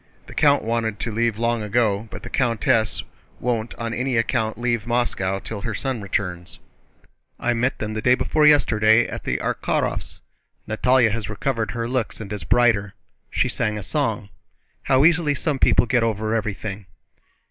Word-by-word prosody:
The - - -11
count 145 -2 +3
wanted 115 -2 -1
to 115 - -2
leave 115 0 0
long 115 0 0
ago, 105 0 0
but - - -9
the - - -7
countess 115 -3 +1 0.4
won't 115 -2 -2
on 115 -1 -4
any 125 0 -1
account 110 -1 0
leave 120 -2 -1
Moscow 115 -6 0
till 100 +1 -6
her 115 -1 -3
son 130 -2 -3
returns." 90 -3 -3 0.8
"I 120 - +1
met 125 +3 0
them 105 0 -4
the 110 - -3
day 125 +2 +4
before 150 +3 +2
yesterday 110 -6 +4
at - - -7
the - - 0
Arkhárovs'. - - -2 0.5
Natalie 125 +2 +3
has 110 0 -3
recovered 115 +1 -2
her 115 -1 -3
looks 125 -2 -2
and 105 -2 -6
is 100 -5 -5
brighter. 105 -1 +2 0.3
She - - +1
sang 105 -2 -1
a 105 - -5
song. 110 -5 -2 0.5
How 135 +2 +3
easily 160 -3 +3
some 145 -2 -1
people - - +4
get 120 0 +2
over 110 -1 -1
everything!" 105 -2 -3
115 Hz, 170 wpm, -22 LUFS, 105-125 Hz, 0.8 s, day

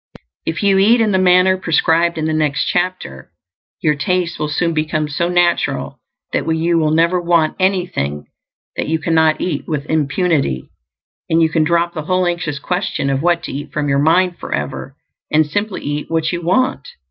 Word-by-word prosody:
If 165 +5 -2
you 195 -1 +4
eat 225 +5 +5
in 220 -2 +2
the 190 - +2
manner 185 0 +4
prescribed 170 -1 +1
in 155 - -2
the 160 - 0
next 150 -2 0
chapter, 175 - -3 0.5
your 155 -2 +2
taste 175 +3 -1
will 150 - -2
soon 165 +3 0
become 155 -1 -1
so 170 +4 -1
natural 175 -1 0 0.3
that - - 0
you 165 +1 +1
will 155 -1 +1
never 170 +3 +2
WANT 170 -2 +2
anything 180 - -1 0.5
that - - -3
you 160 +1 +1
cannot 160 -1 +2
eat 180 - -3
with 150 -3 -3
impunity; 150 - 0 0.6
and 165 - +3
you 160 -1 +3
can 160 -1 +1
drop 170 +2 +1
the 155 - -4
whole 185 +1 +1
anxious 170 -4 -2
question 180 -3 -2
of 135 0 -1
what 175 0 +1
to - - -5
eat 145 +2 -6
from 145 -1 -2
your 140 0 +2
mind 175 +4 +2
forever, 135 0 -5 0.4
and 155 +1 +4
simply 205 +6 -3
eat 145 +1 -4
what 160 -1 0
you 175 -1 -3
want. 210 - 0
165 Hz, 180 wpm, -17 LUFS, 150-180 Hz, 0.6 s, eat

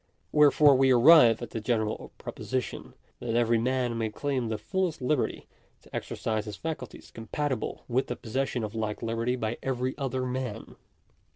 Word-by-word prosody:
Wherefore 150 -1 +6
we 135 0 +4
arrive 125 -2 +7
at - - -7
the 115 - -3
general 110 -1 -1
proposition, 130 -1 -5 0.2
that - - -7
1 115 - 0
every 115 -1 +3
man 125 0 0
may 110 -1 0
claim 130 +1 -2
the 110 -1 -2
fullest 175 - -2
liberty 130 +1 -1 0.4
to - - -12
exercise 110 -1 -2
his 105 -2 -7
facul! 155 -7 -4
ties - - -14
compatible 130 +3 -3
with 130 +2 0
the 125 - -3
possession 125 +1 -2
of 105 0 -4
like 110 -1 -3
liberty 115 +2 -1
by 115 -1 -3
every 130 0 -2
other 130 -2 -2
man. 125 -3 -4
125 Hz, 170 wpm, -28 LUFS, 115-135 Hz, 0.4 s, arrive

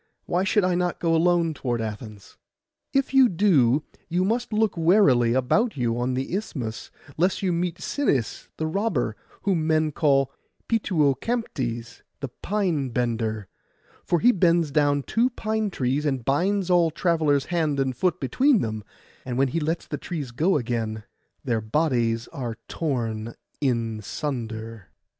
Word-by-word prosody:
Why 180 +2 0
should 200 +1 +2
I 185 0 +2
not 175 0 -1
go 165 -1 +1
alone 170 0 +3
toward 120 -5 -2
Athens?' 105 -2 -7 0.6
'If 275 -1 0
you 265 -2 +6
do, 155 - +3 0.3
you 180 +2 +1
must 235 +4 -1
look 215 -1 +1
warily 160 - +4
about 195 - +1
you 120 -2 0
on 125 +1 0
the 130 +5 -3
Isthmus, 120 - -4 0.3
lest 185 +4 +1
you 185 -2 +1
meet 170 0 -2
Sinis 155 - -1
the 160 - -2
robber, 155 - -1 0.3
whom 170 -6 +1
men 155 -1 +2
call 135 -3 +2 0.4
Pituocamptes 145 - -1 0.2
the 140 -2 -4
pine 175 - -1
bender; 115 -4 -2 0.6
for 175 - +1
he 245 +7 +6
bends 170 -6 +2
down 145 -1 +2
two 235 - +1
pine 220 -3 -2
trees, 135 -3 -1
and 135 -5 -1
binds 185 +6 +1
all 175 -2 +4
travellers 155 -4 +1
hand 155 -5 +1
and 130 -2 0
foot 180 +6 0
between 250 - +3
them, 110 -1 -3 0.4
and 125 -1 -4
when 135 0 +3
he 165 - -1
lets 160 +2 -2
the - - -5
trees 150 -8 -5
go 160 +9 +2
again 115 -4 -3 0.4
their 115 -4 0
bodies 115 -2 0
are 120 -4 -5
torn 115 -7 -3 0.3
in 115 -5 0
sunder. 115 -3 -5
150 Hz, 150 wpm, -25 LUFS, 120-180 Hz, 0.6 s, you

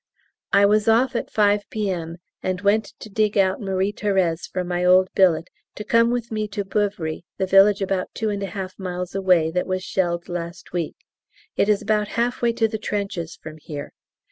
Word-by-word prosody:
I 200 0 +5
was 210 +1 +3
off 240 +3 +3
at - - -2
5 205 -1 +2
P.M., 180 -6 -3 0.2
and 185 -1 -2
went 205 +2 +3 0.2
to - - -7
dig 215 0 0
out 190 +1 +2
Marie 195 0 -1
Thérèse 190 -6 0
from 185 -1 -3
my 175 0 -1
old 185 +1 +5
billet, 170 -3 +3 0.3
to 210 - -6
come 230 +2 +3
with 240 -1 -2
me 215 -1 -1
to 205 0 -4
Beuvry, 195 -6 -1 0.2
the 190 - 0
village 195 +1 +5
about 190 -1 -1
two 220 -1 -1
and 200 -1 -3
a 195 - -2
half 190 +1 -6
miles 180 -1 -4
away 180 -4 +3
that 180 +1 -1
was 185 0 -2
shelled 175 -3 -1
last 175 -1 -6
week; 170 -3 -2 0.6
it 200 - +2
is 210 -1 +2
about 210 -1 +1
half 240 +1 0
way 235 -1 +3
to 225 -1 +2
the 220 0 -5
trenches 195 -6 -3
from 155 0 -9
here. 145 -1 -7
195 Hz, 195 wpm, -23 LUFS, 180-210 Hz, 0.6 s, I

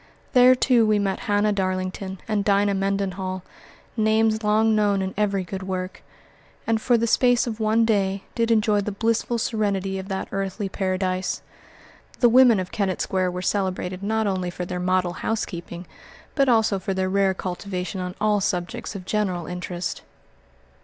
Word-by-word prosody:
There, 250 0 +7
too, 245 -2 +3
we 215 -1 +3
met 195 -1 -1
Hannah 205 +1 +2
Darlington 185 0 -3
and 210 -2 0
Dinah 200 0 +2
Mendenhall, 195 -1 -2 0.5
names 220 0 +2
long 215 +1 +3
known 205 -2 +2
in 190 - -4
every 200 -2 0
good 190 +2 -6
work, 185 0 -4 0.6
and, 225 -1 +1
for 245 0 +3
the 230 - +1
space 245 +1 +3
of 230 -2 -5
one 220 +1 +3
day, 195 -3 0
did 230 -1 0
enjoy 215 -2 +3
the 210 - -3
blissful 230 +3 0
serenity 200 -4 -1
of 190 - -7
that 190 -1 -3
earthly 195 +1 -3
paradise. 185 -1 -2 0.8
The 240 - +5
women 245 -3 +6
of 185 -1 -4
Kennett 195 -4 -1
Square 185 -1 0
were 180 0 -5
celebrated 185 -2 -1
not 220 +2 0
only 185 -3 -1
for 175 0 -5
their 180 - -4
model 180 -1 +1
housekeeping 175 -4 -4 0.5
but 275 -2 +2
also 220 -4 +3
for 195 0 -3
their 190 0 0
rare 195 0 +2
cultivation 185 +1 -4
on 180 0 -5
all 210 -1 +2
subjects 205 +5 -3
of 185 -2 -7
general 190 -5 -1
interest. 180 0 -5
195 Hz, 165 wpm, -24 LUFS, 185-220 Hz, 0.8 s, There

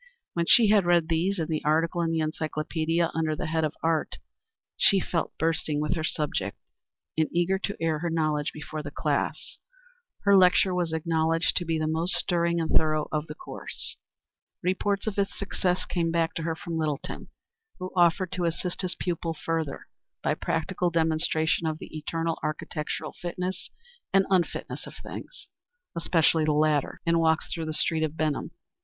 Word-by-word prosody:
When 170 -1 0
she 225 -3 +7
had 205 -4 +4
read 170 -2 +4
these 175 +5 +1
and 160 -3 -1
the 155 -2 -2
article 165 +3 +2
in 165 - +1
the 165 -1 +1
encyclopædia 155 +2 -1
under 160 -1 0
the - - -3
head 160 0 0
of 155 -1 -1
Art, 160 -1 0 0.6
she 195 - +4
felt 170 -2 -2
bursting 160 -2 0
with 150 +2 0
her 160 - -2
subject 140 -11 -1 0.6
and 160 -1 +2
eager 175 +3 +2
to 200 - -3
air 160 -2 0
her 170 +2 -1
knowledge 155 -2 0
before 155 0 -6
the 145 - -6
class. 145 - -2 0.6
Her 200 0 +5
lecture 185 0 +5
was 175 -2 0
acknowledged 160 +1 +1
to 175 - 0
be 165 -1 0
the 155 - 0
most 160 +3 +1
stirring 170 -2 +2
and 160 -1 -1
thorough 155 -1 +2
of 155 0 -1
the 150 - -7
course. - - -6 0.7
Reports 195 +2 0
of 210 -2 -2
its 195 - -1
success 185 -2 -1
came 170 -2 0
back 165 0 +1
to 165 - -3
her 165 0 -1
from 170 -1 -5
Littleton, 155 -3 -3 0.5
who 185 0 -5
offered 175 +1 +3
to 180 -1 -1
assist 170 +2 -1
his 185 -1 -2
pupil 165 -2 -2
further 160 -2 -3 0.4
by - - +2
practical 175 +2 -1
demonstration 160 0 +1
of 155 -1 -1
the - - -10
eternal 165 +2 -2
architectural 155 0 -3
fitness 180 +1 -3 0.4
and 195 0 +4
unfitness 180 -3 0
of - - -10
things - - -9 0.5
especially 165 -1 +3
the 155 0 +2
latter 150 -1 +1
in 170 0 +3
walks 160 0 +2
through 165 -2 -3
the 155 - -2
streets 160 0 +1
of 155 +1 -6
Benham. 155 -3 0
165 Hz, 175 wpm, -27 LUFS, 155-175 Hz, 0.7 s, she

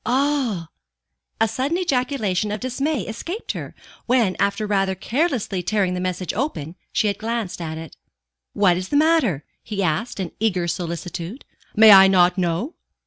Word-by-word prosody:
"Ah!" 255 - 0 0.7
A 225 - +4
sudden 260 +9 -1
ejaculation 250 - 0
of 210 - -3
dismay 265 +3 -1
escaped 335 - -5
her, - - -7 0.3
when, 235 -6 +2
after 200 +2 0
rather 195 -2 +1
carelessly 240 - -1
tearing 190 0 0
the 180 - -2
message 185 -1 -3
open, 175 - -3 0.2
she - - +1
had 200 -1 0
glanced 225 -5 -3
at 160 -1 -4
it. 160 -2 -9 0.6
"What 185 -4 +3
is 185 +1 -5
the 290 - +2
matter?" 295 - +2 0.2
he 205 -3 -3
asked 175 +8 -1
in 185 -3 -3
eager 185 -5 0
solicitude. 170 - -5 0.3
"May 220 0 +8
I 195 -1 +9
not 180 -2 +4
know?" 185 - -1
205 Hz, 155 wpm, -22 LUFS, 180-250 Hz, 0.7 s, I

